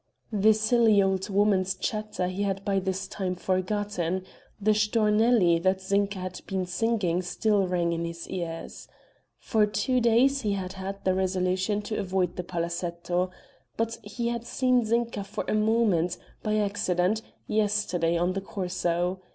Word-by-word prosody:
The 215 +1 +5
silly 220 -1 +4
old 190 +1 +1
woman's 195 -2 +2
chatter 215 -2 -2
he 185 +2 -3
had 195 -1 -1
by 195 -1 +2
this 190 0 -3
time 185 -2 -3
forgotten; 185 -1 -1 0.3
the 215 +1 +3
Stornelli 210 -4 +3
that 190 +1 +2
Zinka 200 +1 0
had 185 -1 -6
been 190 -1 -1
singing 185 -2 0
still 200 +2 +1
rang 175 -2 0
in 170 0 -2
his 170 0 -6
ears. 170 -3 -6 0.5
For 215 -3 +2
two 210 +5 +1
days 250 +4 +4
he 210 -2 0
had 190 -2 -4
had 195 +1 -6
the 185 - +3
resolution 185 +2 0
to 215 +1 -3
avoid 185 -1 0
the 180 - -3
Palazetto, 175 +1 -2 0.5
but 230 0 -1
he 235 +3 -3
had 235 -1 -3
seen 250 0 +2
Zinka 230 -2 0
for 200 - -5
a - - 0
moment, 215 -6 +2 0.2
by 215 0 0
accident, 200 -1 +1 0.2
yesterday 205 -6 +1
on 175 +2 +1
the 195 - -2
Corso. 180 -1 -2
195 Hz, 150 wpm, -27 LUFS, 180-215 Hz, 0.5 s, The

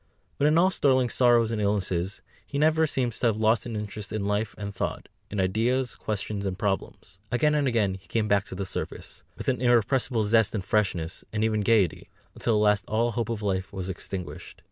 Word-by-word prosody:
But 145 - +4
in 155 +2 +4
all 185 +3 +5
Sterling's 130 -7 +2
sorrows 120 -3 +4
and 110 -2 -1
illnesses, 95 -2 -1 0.2
he 140 - -5
never 160 +2 +3
seems 125 -5 -1
to 120 - +2
have 110 -2 +1
lost 110 +1 +2
his 120 -2 -5
interest 105 -1 -6
in 110 -2 -2
life 105 +1 -1
and 100 -1 -5
thought, 95 - -3 0.2
in 105 - -3
ideas, 120 +7 +1
questions, 105 -1 -4
and 95 -2 -3
problems. 95 -2 -3
Again 150 +5 +2
and 145 -2 +2
again 110 -6 +1
he 95 0 -11
came 110 -2 0
back 100 -1 +2
to - - -8
the 100 +1 -3
surface, - - -6 0.2
with - - -7
an 125 -2 +1
irrepressible 120 -1 +2
zest 110 +1 +3
and 95 -3 -3
freshness, 95 -5 -1
and 105 0 -1
even 110 -1 +1
gaiety, 105 -3 +2 0.2
until 115 - 0
at 105 0 +3
last 105 -1 +3
all 115 +2 +1
hope 115 0 -2
of 110 -2 -3
life 95 -2 -1
was 95 -1 -5
extinguished. 95 -1 -6
110 Hz, 210 wpm, -26 LUFS, 100-120 Hz, 0.2 s, all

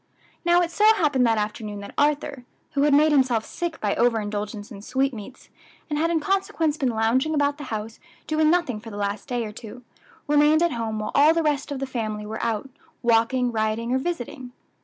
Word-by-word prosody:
Now 345 0 +4
it 340 - -3
so 415 - -1
happened 275 - +2
that 225 -1 +2
afternoon 210 0 -3
that 200 - -9
Arthur, 290 -2 0 0.3
who 280 - 0
had 290 0 +4
made 305 +2 +5
himself 255 -6 +2
sick 345 -2 -4
by 205 -2 0
over 235 -2 +3
indulgence 205 +1 -5
in 200 -2 -9
sweetmeats, 260 0 -3 0.4
and 295 - 0
had 330 +2 +2
in 335 -1 +1
consequence 385 -2 0
been 270 -4 0
lounging 240 +7 +1
about 290 0 +1
the 290 - -6
house 220 -1 -5 0.3
doing 310 0 +2
nothing 320 -10 +1
for 225 +1 -10
the 205 - -8
last 200 +1 -3
day 245 -3 -2
or 210 - -6
two, 225 +3 -11 0.4
remained 295 +2 +4
at 340 - +2
home 225 -2 -3
while 215 - -3
all 300 +3 +5
the 330 - +1
rest 295 -2 -1
of 285 - -2
the 270 - -3
family 215 -5 -4
were 220 +1 -5
out, 225 +2 -1 0.4
walking, 240 +2 +2
riding, 225 +2 -1
or 260 - +2
visiting. 260 -4 -5
255 Hz, 205 wpm, -24 LUFS, 220-295 Hz, 0.4 s, made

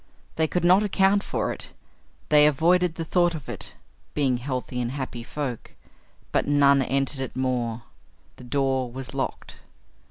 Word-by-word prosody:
They 160 0 +2
could 180 +2 -1
not 180 +3 +6
account 200 -1 +3
for - - -2
it. - - -9 0.6
They 150 0 +7
avoided 170 +3 +3
the 165 - -4
thought 175 0 +2
of 150 - -8
it, - - -8 0.4
being 135 -4 +2
healthy 125 -1 -4
and 120 +1 -3
happy 130 -4 -5
folk. 125 -1 -5 0.6
But - - +1
none 140 -1 +5
entered 135 +1 -1
it 130 - -5
more. 125 -3 -1 0.5
The - - -12
door 130 -1 0
was 130 +1 -6
locked. - - -4
140 Hz, 155 wpm, -25 LUFS, 130-160 Hz, 0.6 s, They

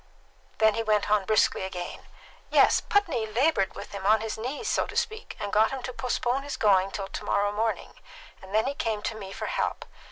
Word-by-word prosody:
Then 220 -1 +4
he 230 - -1
went 210 -2 +1
on 210 -2 +3
briskly 215 +1 +3
again. 180 -2 -6 0.4
"Yes. - - +5
Putney 335 - +1
laboured 225 -3 +1
with - - -8
him 200 -1 -6
on 215 +2 +4
his 225 -1 -3
knees, 260 - -4
so - - +1
to - - -6
speak, 440 0 -3
and 205 - -4
got 215 +1 +5
him 265 -2 -5
to 255 - -5
postpone 250 +1 -1
his 285 0 -5
going 195 -2 +4
till 195 0 -5
to - - -6
morrow 205 0 +1
morning; 220 +2 -2 0.4
and 190 - -12
then 220 +2 +2
he 275 - -1
came 220 -6 -2
to 225 - -2
me 195 -3 -8
for - - -5
help. - - -2
220 Hz, 215 wpm, -27 LUFS, 200-250 Hz, 0.4 s, Yes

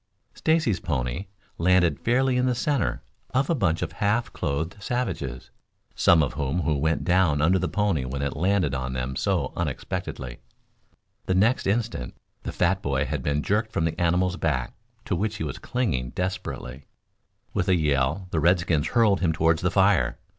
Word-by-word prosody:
Stacy's 155 - +1
pony 65 +4 -2 0.3
landed 90 -3 +3
fairly 130 +2 +2
in 125 0 +2
the 125 - +1
center 140 - -1 0.3
of 135 +4 +2
a - - +4
bunch 90 - +1
of - - -4
half 110 +3 0
clothed 80 +8 -3
savages; 85 - -3 0.4
some 80 -2 +5
of 70 - -2
whom 75 +5 -2 0.2
went 80 +2 +1
down 90 -5 +3
under 90 +5 +3
the 90 - -1
pony 100 -9 0
when 65 +2 -4
it 70 - -2
landed 90 -2 +1
on 65 -1 -3
them 65 +1 -3
so - - 0
unexpectedly. 60 -2 -4 0.9
The 95 - +1
next 110 +6 +2
instant 105 - -1 0.3
the - - -5
fat 95 +2 +1
boy 70 -2 0
had 75 -3 -3
been 70 +2 -1
jerked 110 +2 0
from 80 - 0
the 80 +2 -2
animal's 90 +1 +2
back, 70 -6 -1 0.3
to - - -1
which 105 +1 -1
he 90 - -4
was 75 -4 -5
clinging 80 - -1
desperately. 80 -6 -5 0.7
With 95 -2 0
a 95 - +5
yell 75 +3 0
the 80 - +1
redskins 85 -2 +2
hurled 110 -5 +3
him 85 -3 +2
toward 80 0 +2
the 90 - +1
fire. 95 -1 +3
90 Hz, 170 wpm, -25 LUFS, 70-100 Hz, 0.9 s, some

